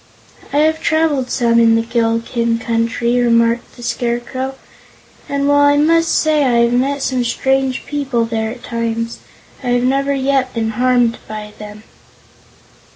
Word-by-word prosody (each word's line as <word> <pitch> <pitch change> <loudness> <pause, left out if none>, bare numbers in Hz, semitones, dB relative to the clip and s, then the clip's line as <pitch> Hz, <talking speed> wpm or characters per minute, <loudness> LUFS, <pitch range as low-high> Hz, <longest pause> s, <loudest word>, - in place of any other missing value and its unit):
"I - - -1
have 315 +1 +2
traveled 310 -5 +1
some 235 -2 +2
in 225 -1 +5
the 225 - +1
Gillikin 230 0 0
Country," 230 +1 0
remarked 235 0 +1
the 240 - -12
Scarecrow, 245 +3 -3 0.7
"and 280 0 -1
while 285 0 +4
I 285 0 +4
must 330 +2 +3
say 310 -2 +2
I 240 -3 +3
have 235 0 +1
met 270 +3 0
some 255 -2 0
strange 265 +2 0
people 270 -5 -1
there 220 -1 -2
at 240 +1 -9
times, 230 0 -3 0.4
I 260 - -6
have 245 0 +1
never 275 +2 +1
yet 265 -1 0
been 225 -1 -1
harmed 245 0 +1
by 210 -1 -7
them." 210 0 -10
245 Hz, 155 wpm, -17 LUFS, 230-275 Hz, 0.7 s, in